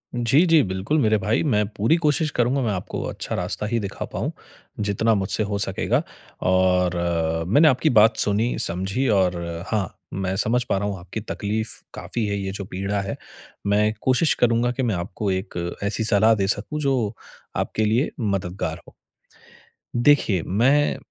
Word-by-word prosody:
जी, 120 +8 +3
जी। 165 -3 +5
बिल्कुल, 95 +11 -1
मेरे 110 -4 +3
भाई 105 +7 0
मैं 105 -8 +2
पूरी 110 +8 +1
कोशिश 155 +1 +2
करूँगा, 125 +3 +1
मैं 115 - 0
आपको 90 -3 -4
अच्छा - - -5
रास्ता - - -3
ही 115 +2 0
दिखा 100 -2 -5
पाऊँ। - - -3 0.5
जितना 105 +2 +1
मुझसे 100 +2 0
हो 100 0 -2
सकेगा - - 0 0.5
और 90 -1 +3 0.5
मैंने 145 - +5
आपकी 135 +3 +3
बात 110 -2 +5
सुनी, 105 +4 +1
समझी 95 +10 -1
और 95 -4 +2 0.3
हाँ, 105 -5 -2 0.2
मैं 95 -1 -2
समझ 120 +4 +1
पा 120 - -1
रहा 100 +1 -1
हूँ 100 - -3
आपकी 90 +5 -6
तकलीफ़ 110 +1 -3 0.2
काफ़ी 115 -2 -3
है 100 0 -1
ये 95 -1 -3
जो 100 0 -6
पीड़ा 100 +2 -2
है। 100 - -4 0.5
मैं 105 +1 +3
कोशिश 130 +5 +3
करूँगा 120 0 +3
कि 125 +2 -2
मैं 115 -5 0
आपको 90 +3 -3
एक 90 -2 -3
ऐसी 105 +2 -1
सलाह 110 +1 +4
दे 100 -2 0
सकूँ, 105 +9 -2
जो 130 -7 0 0.4
आपके 110 - -1
लिए 115 +7 +2
मददगार 95 -4 -2
हो। - - -16 1.0
देखिए, 120 - +3
मैं 135 +9 +2
105 Hz, 170 wpm, -23 LUFS, 95-120 Hz, 1.0 s, जी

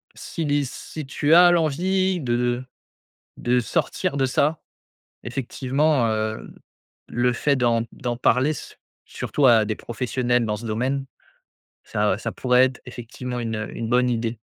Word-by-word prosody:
si 165 - -5
l'i 145 -1 +1
si 150 +4 -7
tu 145 +3 +1
as 175 +1 +8
l'envie 180 +3 +1
de 120 -3 0
de 120 +1 0 0.8
de 125 +1 +1
sortir 120 +4 -1
de 135 -1 +2
ça, 150 +4 +1 0.6
effectivement, 135 +2 0
heu, 110 0 -3 0.5
le 120 +1 +1
fait 140 +4 +1
d'en 120 -3 +2
d'en 120 -3 -4
parler, 130 +4 +2
su - - -9 0.3
surtout 145 - -1
à 115 -2 +6
des 110 0 -2
professionnels 120 0 -1
dans 105 -1 -2
ce 115 - -9
domaine, 130 +5 -1 0.8
ça 105 -2 0
ça - - -4
pourrait 125 0 +4
être, 130 -1 -3
effectivement, 125 +1 -6
une 110 -2 -3
une 115 - -4
bonne 125 +1 +3
idée. 115 -1 -2
125 Hz, 150 wpm, -23 LUFS, 115-140 Hz, 0.8 s, as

